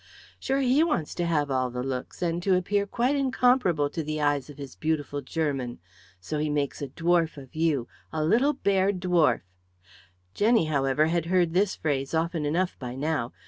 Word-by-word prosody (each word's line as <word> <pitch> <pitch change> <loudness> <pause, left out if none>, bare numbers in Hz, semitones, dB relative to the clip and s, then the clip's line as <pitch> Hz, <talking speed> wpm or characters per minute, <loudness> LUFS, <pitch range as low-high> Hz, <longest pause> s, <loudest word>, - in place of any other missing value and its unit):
Sure, 270 +1 0
he 265 +4 +4
wants 295 - -1
to 175 -1 -2
have 150 -4 0
all 130 -1 +1
the 125 0 -4
looks 130 +6 -4
and 170 0 0
to 190 +1 +3
appear 200 +3 0
quite 245 +6 +1
incomparable 250 - +2
to 160 +3 -4
the 155 0 -3
eyes 145 -2 0
of 145 - -11
his 140 -3 -8
beautiful 145 -2 -2
German. 135 -4 -2 0.4
So 150 +12 -4
he 150 0 0
makes 145 -1 -2
a 140 - -3
dwarf 165 +2 +1
of 135 -2 -11
you, 155 -6 +1 0.2
a 155 -1 -1
little 245 - +3
bear 200 -6 +2
dwarf 175 - +2 0.5
" 90 +1 -27
Jenny, 220 -3 +3
however, 140 0 +2
had 165 0 0
heard 175 -2 +2
this 190 +2 +2
phrase 140 -1 -2
often 160 -1 0
enough 180 +5 -1
by 125 -1 -6
now. 140 -3 -1
160 Hz, 185 wpm, -27 LUFS, 140-185 Hz, 0.5 s, he